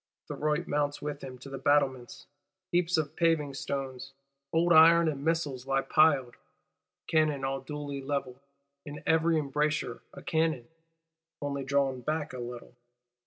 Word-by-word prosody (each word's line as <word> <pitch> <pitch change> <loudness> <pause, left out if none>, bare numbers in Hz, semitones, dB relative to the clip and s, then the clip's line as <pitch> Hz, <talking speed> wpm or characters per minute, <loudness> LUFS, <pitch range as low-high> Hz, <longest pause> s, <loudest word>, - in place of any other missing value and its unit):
Thuriot 150 +3 -1
mounts 145 -2 -1
with 145 -1 -5
him 130 -1 -7
to 125 +2 -11
the 135 - -5
battlements: 130 -3 +1 0.5
heaps 175 -1 +2
of 155 -2 -2
paving 165 -4 +1
stones, 135 -1 -5 0.4
old 170 +1 +3
iron 165 +1 +7
and 140 -3 -2
missiles 145 -5 -1
lie 135 0 +1
piled; 140 -6 +3 0.7
cannon 155 -4 +1
all 135 0 -2
duly 145 0 -5
levelled; 135 -2 -3 0.4
in 150 0 -9
every 160 0 +3
embrasure 150 -3 -1
a - - -12
cannon,—only 160 -1 -4
drawn 135 -2 +1
back 150 +1 -2
a 130 - -6
little! 120 0 -8
145 Hz, 135 wpm, -29 LUFS, 135-160 Hz, 0.7 s, iron